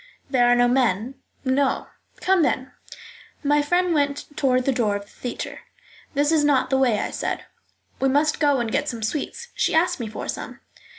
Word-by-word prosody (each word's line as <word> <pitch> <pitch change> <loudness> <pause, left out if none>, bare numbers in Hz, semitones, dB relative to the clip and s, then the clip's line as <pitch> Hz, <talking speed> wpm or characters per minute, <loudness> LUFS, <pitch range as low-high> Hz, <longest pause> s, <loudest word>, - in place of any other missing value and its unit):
"There 245 -3 +4
are 245 - +5
no 245 0 +4
men?" 245 -2 +1 0.3
"No." 265 +1 +1 0.4
"Come, 380 -1 +3
then." 260 -4 0 0.7
My 295 +1 +3
friend 355 +4 +1
went 290 -1 -1
toward 255 -3 +2
the 275 - +3
door 225 -5 +1
of 205 - -4
the 200 - -22
theatre. 245 - -6 0.6
"That 290 +2 +2
is 315 -2 +3
not 275 -3 +2
the 265 - +3
way," 245 -5 +3
I - - -2
said. - - -3 0.6
"We 270 - +2
must 295 +3 +2
go 290 -2 +3
and 230 -2 -2
get 290 +2 0
some 230 -2 -5
sweets. 300 - -3
She - - 0
asked 350 +1 +2
me 235 - -3
for 215 - -6
some." - - -5
270 Hz, 190 wpm, -23 LUFS, 245-295 Hz, 0.7 s, are